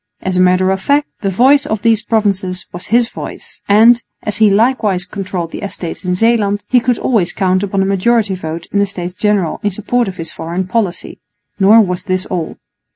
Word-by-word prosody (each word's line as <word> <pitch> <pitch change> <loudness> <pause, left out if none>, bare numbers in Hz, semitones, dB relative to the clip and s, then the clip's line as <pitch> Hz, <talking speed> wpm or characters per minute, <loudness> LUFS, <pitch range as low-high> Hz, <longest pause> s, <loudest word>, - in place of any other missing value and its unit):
As 190 -1 -3
a - - +1
matter 185 +1 +3
of 190 0 -2
fact, 290 +5 +1
the 200 - -1
voice 265 +9 +3
of 215 -1 -3
these 225 -1 +3
provinces 195 -5 -1
was 175 +1 -7
his 235 +2 +2
voice; - - -9
and, 230 +4 +6 0.2
as 210 - -2
he 220 -1 +5
likewise 210 -3 +1
controlled 185 -3 -5
the - - -7
Estates 190 -3 -6
in 180 -1 -1
Zeeland, 210 -1 +1
he 250 - +4
could 245 0 0
always 215 -9 +1
count 185 -1 0
upon 195 -1 0
a - - -1
majority 200 +2 +1
vote 165 -2 -6
in 200 - +1
the 200 - +2
States 180 -2 -6
General 200 -4 0
in 205 - 0
support 220 +5 -1
of 190 - -6
his 165 - -7
foreign 170 +3 -4
policy. 190 -2 -2 0.4
Nor 210 +4 +6
was 180 -2 -2
this 185 -1 -1
all. 175 -4 -4
195 Hz, 205 wpm, -15 LUFS, 185-225 Hz, 0.4 s, and